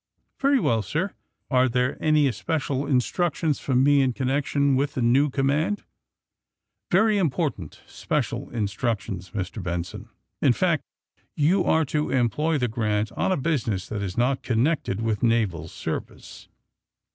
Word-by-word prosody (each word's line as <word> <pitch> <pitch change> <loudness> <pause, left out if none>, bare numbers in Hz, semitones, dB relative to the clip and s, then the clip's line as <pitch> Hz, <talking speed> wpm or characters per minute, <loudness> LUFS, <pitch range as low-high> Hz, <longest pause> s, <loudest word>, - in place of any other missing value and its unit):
^'Very 275 0 +3
good, 115 - +1
sir. 165 - -2 0.4
Are 130 0 +4
there 125 +2 0
any 155 -2 +4
especial 140 0 -2
in 140 -3 +3
structions 165 0 -1
for 130 - -1
me 140 +2 +5
in 130 -2 +1
connection 140 +1 +1
with 140 +2 0
the 130 - -1
new 135 +5 +4
command 145 +9 0 1.1
V 175 - +4
^^Yery 215 0 +3
important 145 - -2
special - - -3
instructions, 105 -4 -3
Mr. 100 +1 -4
Benson. 85 -1 -5 0.3
In - - +5
fact, - - +1 0.5
you 170 +6 +3
are 160 0 +3
to 150 +2 -1
employ 135 +5 +1
the 125 -3 0
^ - - -9
Grant' 105 -2 -1
on - - -1
a 185 - +2
business 120 - -1
that 105 -2 -3
is 95 -2 -4
not 130 +2 +1
connected 120 -3 0
with 110 -3 -1
naval 105 -9 +1
service." - - -7
130 Hz, 150 wpm, -25 LUFS, 110-150 Hz, 1.1 s, me